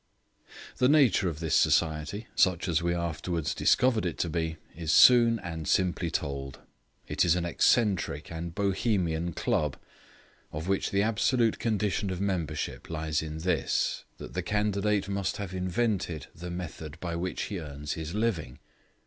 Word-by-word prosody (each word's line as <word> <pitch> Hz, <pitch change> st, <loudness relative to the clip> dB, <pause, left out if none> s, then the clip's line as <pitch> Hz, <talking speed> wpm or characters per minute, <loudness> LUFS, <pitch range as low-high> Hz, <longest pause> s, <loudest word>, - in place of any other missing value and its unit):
The 125 Hz, -, +4 dB
nature 130 Hz, -, +4 dB
of 80 Hz, -2 st, -6 dB
this 80 Hz, -2 st, -2 dB
society, 80 Hz, +6 st, +2 dB
such 90 Hz, -2 st, +2 dB
as 85 Hz, -1 st, +1 dB
we 85 Hz, 0 st, 0 dB
afterwards 85 Hz, -2 st, -2 dB
discovered 125 Hz, -4 st, +3 dB
it 85 Hz, -3 st, -2 dB
to 85 Hz, -, -1 dB
be, 80 Hz, -1 st, -2 dB, 0.2 s
is 80 Hz, -1 st, -2 dB
soon 115 Hz, +3 st, +7 dB
and 80 Hz, -6 st, -6 dB
simply 90 Hz, -2 st, +1 dB
told. 70 Hz, -4 st, -3 dB, 0.5 s
It -, -, +1 dB
is 85 Hz, -1 st, +4 dB
an 90 Hz, -1 st, -1 dB
eccentric 95 Hz, -, +1 dB
and 85 Hz, +1 st, -5 dB
Bohemian 90 Hz, -5 st, 0 dB
Club, 75 Hz, -2 st, 0 dB, 0.7 s
of 80 Hz, +3 st, -5 dB
which 95 Hz, 0 st, 0 dB
the 100 Hz, 0 st, +2 dB
absolute 115 Hz, +2 st, +2 dB
condition 105 Hz, -3 st, 0 dB
of 90 Hz, -1 st, -3 dB
membership 85 Hz, -7 st, -3 dB
lies 80 Hz, -2 st, -1 dB
in 80 Hz, 0 st, -5 dB
this, 85 Hz, -4 st, 0 dB
that -, -, -9 dB
the 90 Hz, -, -1 dB
candidate 105 Hz, 0 st, 0 dB
must 100 Hz, -1 st, -2 dB
have 100 Hz, -2 st, -5 dB
invented 90 Hz, -, -1 dB
the 90 Hz, +2 st, -8 dB
method 80 Hz, -3 st, -7 dB
by 85 Hz, -2 st, -4 dB
which 90 Hz, +2 st, -3 dB
he 100 Hz, -, -4 dB
earns 75 Hz, -1 st, -5 dB
his 80 Hz, +2 st, -5 dB
living. 90 Hz, -, -1 dB
85 Hz, 155 wpm, -28 LUFS, 80-100 Hz, 0.7 s, soon